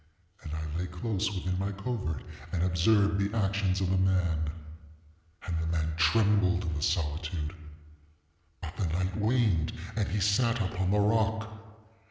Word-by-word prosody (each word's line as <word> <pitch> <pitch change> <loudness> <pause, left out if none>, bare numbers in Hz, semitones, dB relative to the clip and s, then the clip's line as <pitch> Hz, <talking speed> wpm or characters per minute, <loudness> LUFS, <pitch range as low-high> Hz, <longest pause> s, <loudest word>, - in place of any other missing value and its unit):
And 75 - -8
I 80 +1 -4
lay 90 - -2
close 100 +4 -2
within 95 -2 -2
my 100 +1 -1
covert 100 - -3 0.3
and 90 -2 0
observed 100 +3 +3
the 100 +3 0
actions 95 -2 +1
of 95 -1 +1
the 95 - +2
man. 85 -5 +1 1.0
And 85 - -2
the 80 - -2
man 80 -1 0
trembled 100 0 +3
in 85 -2 -2
the 75 - -3
solitude; 80 0 -1 1.1
ŌĆöbut 80 -1 -6
the 95 - 0
night 95 +1 -1
waned 105 -7 +2 0.2
and 105 -3 0
he 105 - -1
sat 115 +4 +2
upon 95 -2 -1
the 105 +2 +3
rock. 110 +1 +2
95 Hz, 155 wpm, -29 LUFS, 85-105 Hz, 1.1 s, observed